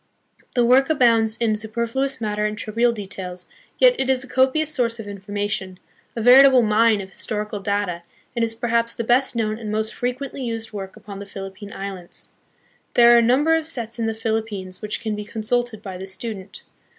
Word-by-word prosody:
The 245 Hz, -1 st, +4 dB
work 260 Hz, +4 st, +4 dB
abounds 230 Hz, -6 st, +3 dB
in 225 Hz, -2 st, +1 dB
superfluous 235 Hz, +5 st, -2 dB
matter 210 Hz, -2 st, -2 dB
and 210 Hz, 0 st, -5 dB
trivial 230 Hz, +3 st, +1 dB
details, 190 Hz, -4 st, -6 dB, 0.3 s
yet -, -, +6 dB
it 265 Hz, -, 0 dB
is 260 Hz, 0 st, +2 dB
a -, -, -11 dB
copious 265 Hz, +5 st, +2 dB
source 235 Hz, -3 st, 0 dB
of 215 Hz, -, -7 dB
information, 200 Hz, -1 st, -4 dB, 0.4 s
a 230 Hz, -, -3 dB
veritable 260 Hz, +1 st, +8 dB
mine 215 Hz, 0 st, +3 dB
of 190 Hz, 0 st, -10 dB
historical 210 Hz, +1 st, -4 dB
data, 200 Hz, -3 st, -2 dB, 0.3 s
and 235 Hz, -, +1 dB
is 225 Hz, 0 st, 0 dB
perhaps 230 Hz, 0 st, 0 dB
the 235 Hz, -, -3 dB
best 245 Hz, +3 st, +2 dB
known 215 Hz, -1 st, -1 dB
and 215 Hz, -2 st, -5 dB
most 220 Hz, +1 st, -1 dB
frequently 255 Hz, +2 st, -4 dB
used 225 Hz, -2 st, -4 dB
work 195 Hz, -2 st, -6 dB
upon 205 Hz, -2 st, -10 dB
the 200 Hz, -, -8 dB
Philip 195 Hz, -1 st, -8 dB
pine 205 Hz, -1 st, -9 dB
Islands. 195 Hz, -4 st, -7 dB, 0.7 s
There 240 Hz, 0 st, +7 dB
are 235 Hz, -, +7 dB
a -, -, +4 dB
number 275 Hz, +8 st, +3 dB
of 320 Hz, -1 st, -1 dB
sets 235 Hz, -7 st, -2 dB
in 225 Hz, -, 0 dB
the 225 Hz, -, -2 dB
Philip 225 Hz, 0 st, -1 dB
pines 185 Hz, -3 st, -7 dB
which 210 Hz, +2 st, -3 dB
can 220 Hz, -2 st, -2 dB
be 210 Hz, -, -5 dB
consulted 220 Hz, +1 st, -2 dB
by 190 Hz, -2 st, -7 dB
the 190 Hz, -, -6 dB
student. 195 Hz, 0 st, -6 dB
225 Hz, 200 wpm, -22 LUFS, 205-240 Hz, 0.7 s, veritable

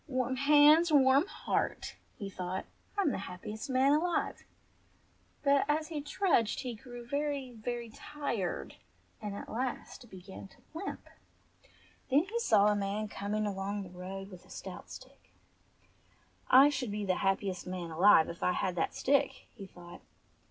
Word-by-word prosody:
"Warm 255 Hz, -2 st, -1 dB
hands, 300 Hz, +4 st, +6 dB
warm 275 Hz, +3 st, +5 dB
heart -, -, -2 dB
!" -, -, -37 dB
he 200 Hz, -, -5 dB
thought. 185 Hz, -1 st, -4 dB, 0.3 s
"I'm 380 Hz, -8 st, +2 dB
the -, -, -3 dB
happiest 210 Hz, +7 st, -7 dB
man 265 Hz, +1 st, +4 dB
alive 335 Hz, +4 st, 0 dB, 0.5 s
!" -, -, -37 dB
But 280 Hz, -1 st, +4 dB
as 310 Hz, +2 st, 0 dB
he 305 Hz, -3 st, -3 dB
trudged 295 Hz, -, +1 dB
he 250 Hz, -2 st, -4 dB
grew 245 Hz, +1 st, -10 dB
very, 280 Hz, -1 st, -2 dB
very 235 Hz, 0 st, -5 dB
tired, 240 Hz, -10 st, -4 dB, 0.4 s
and 205 Hz, -2 st, -4 dB
at -, -, -7 dB
last 250 Hz, 0 st, -5 dB
began 190 Hz, +1 st, -10 dB
to -, -, -22 dB, 0.2 s
limp. 335 Hz, +5 st, -6 dB, 1.0 s
Then 285 Hz, +3 st, +4 dB
he 465 Hz, +3 st, -2 dB
saw 210 Hz, -, +4 dB
a 210 Hz, -, +2 dB
man 205 Hz, +1 st, -2 dB
coming 210 Hz, +2 st, -2 dB
along 200 Hz, 0 st, -3 dB
the 185 Hz, -, -10 dB
road 195 Hz, +2 st, -7 dB
with 180 Hz, -2 st, -12 dB
a -, -, -22 dB
stout -, -, -8 dB
stick. -, -, -13 dB, 1.1 s
"I 270 Hz, +3 st, +8 dB
should 265 Hz, -5 st, -2 dB
be 205 Hz, 0 st, -3 dB
the 185 Hz, -2 st, +1 dB
happiest 195 Hz, -1 st, -1 dB
man 180 Hz, -2 st, -5 dB
alive 165 Hz, 0 st, +6 dB
if 170 Hz, -, -8 dB
I 180 Hz, -, +2 dB
had 180 Hz, 0 st, -1 dB
that 165 Hz, -, -1 dB
stick," 280 Hz, +1 st, +1 dB
he 200 Hz, -4 st, -10 dB
thought. 175 Hz, -2 st, -13 dB
235 Hz, 160 wpm, -31 LUFS, 195-280 Hz, 1.1 s, I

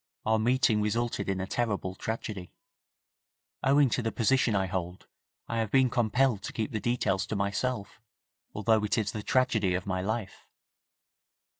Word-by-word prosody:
Our 110 Hz, 0 st, +3 dB
meeting 115 Hz, -2 st, +3 dB
resulted 115 Hz, +1 st, -1 dB
in 95 Hz, -1 st, -1 dB
a 95 Hz, -, -2 dB
terrible 100 Hz, -4 st, -2 dB
tragedy. 105 Hz, -2 st, -5 dB, 1.1 s
Owing 140 Hz, +1 st, +5 dB
to 125 Hz, -, +1 dB
the 115 Hz, -1 st, -1 dB
position 125 Hz, -1 st, +2 dB
I 95 Hz, -1 st, +2 dB
hold 90 Hz, -1 st, -4 dB, 0.4 s
I 115 Hz, -, -2 dB
have 110 Hz, -2 st, 0 dB
been 130 Hz, +1 st, +3 dB
compelled 120 Hz, -1 st, +2 dB
to -, -, -6 dB
keep 110 Hz, -2 st, -2 dB
the 110 Hz, -, -2 dB
details 110 Hz, -4 st, 0 dB
to -, -, -3 dB
myself 100 Hz, +2 st, -2 dB, 0.5 s
although 110 Hz, 0 st, +2 dB
it 105 Hz, +2 st, 0 dB
is 105 Hz, -3 st, 0 dB
the 110 Hz, -, -5 dB
tragedy 110 Hz, -6 st, +2 dB
of 90 Hz, -, -3 dB
my 95 Hz, -2 st, -1 dB
life.' 105 Hz, -1 st, -4 dB
110 Hz, 160 wpm, -29 LUFS, 100-120 Hz, 1.1 s, Owing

